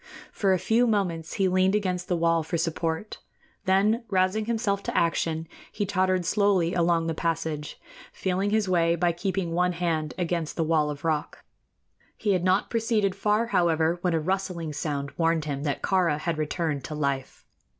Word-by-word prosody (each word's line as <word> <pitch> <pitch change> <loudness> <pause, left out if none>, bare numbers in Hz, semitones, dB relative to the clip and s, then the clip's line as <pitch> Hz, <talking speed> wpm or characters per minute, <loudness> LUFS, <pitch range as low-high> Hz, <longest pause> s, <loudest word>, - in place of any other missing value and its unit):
For 195 -2 +1
a 185 - +4
few 225 +7 +2
moments 175 -7 -1
he 195 -2 +1
leaned 185 +2 +3
against 185 -4 -1
the 175 - 0
wall 165 0 +2
for 160 +2 -3
support; 165 +3 -2 0.5
then, 205 +5 +3
rousing 190 +2 +1
himself 220 -3 0
to - - -3
action, 165 -1 0 0.2
he 205 - -2
tottered 185 -2 +1
slowly 190 -3 +2
along 170 -1 +2
the 165 - -1
passage, 160 -2 -3 0.3
feeling 190 +2 -1
his 215 -1 +1
way 170 -2 +3
by 175 +1 +2
keeping 185 0 -2
one 180 +1 +1
hand 165 -3 -1
against 170 -3 -2
the 165 - 0
wall 155 -2 +2
of 145 +1 -6
rock. 155 -2 -2 0.7
He 210 - 0
had 180 -2 0
not 185 +2 +2
proceeded 220 -4 +1
far, 210 +3 +1
however, 165 0 +2
when 175 -2 +1
a - - +2
rustling 180 -2 -2
sound 140 -1 -3
warned 165 -2 +2
him 140 -2 -3
that 145 - -2
Kāra 180 -6 +2
had 160 +1 -2
returned 155 -2 -2
to 155 - -5
life. 140 -3 -3
175 Hz, 175 wpm, -26 LUFS, 160-195 Hz, 0.7 s, a